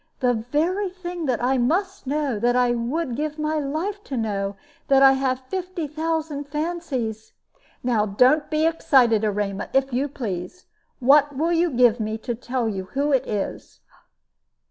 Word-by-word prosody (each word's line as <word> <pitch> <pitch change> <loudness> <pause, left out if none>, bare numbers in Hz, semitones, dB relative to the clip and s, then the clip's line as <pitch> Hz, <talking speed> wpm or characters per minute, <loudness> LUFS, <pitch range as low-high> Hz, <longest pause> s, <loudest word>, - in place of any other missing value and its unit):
"The 250 -1 +2
very 310 - -1
thing 355 -3 -6
that 245 -2 0
I 260 +1 +2
must 370 +7 0
know 280 -5 -1
that 240 +2 +2
I 250 -1 +3
would 245 +4 -2
give 300 +2 -3
my 305 0 -1
life 330 +9 -3
to 270 - -4
know 200 -3 -2 0.3
that 270 0 +5
I 270 - +9
have 265 -1 0
fifty 360 +4 -4
thousand 310 -1 -3
fancies 290 -8 -4 0.2
" - - -34
"Now 225 -4 +1
don't 255 +9 +3
be 310 0 +1
excited, 260 -9 +3
Erema, 205 -1 -2
if 270 -1 +1
you 265 +4 +1
please. 220 - -6 0.3
What 285 +2 +4
will 325 +4 +1
you 340 +1 +2
give 245 -3 +4
me 215 0 -2
to 240 +2 -4
tell 245 0 -2
you 195 -3 -3
who 280 +9 -1
it 265 -3 +2
is?" 205 -2 -4
270 Hz, 165 wpm, -23 LUFS, 235-310 Hz, 0.3 s, I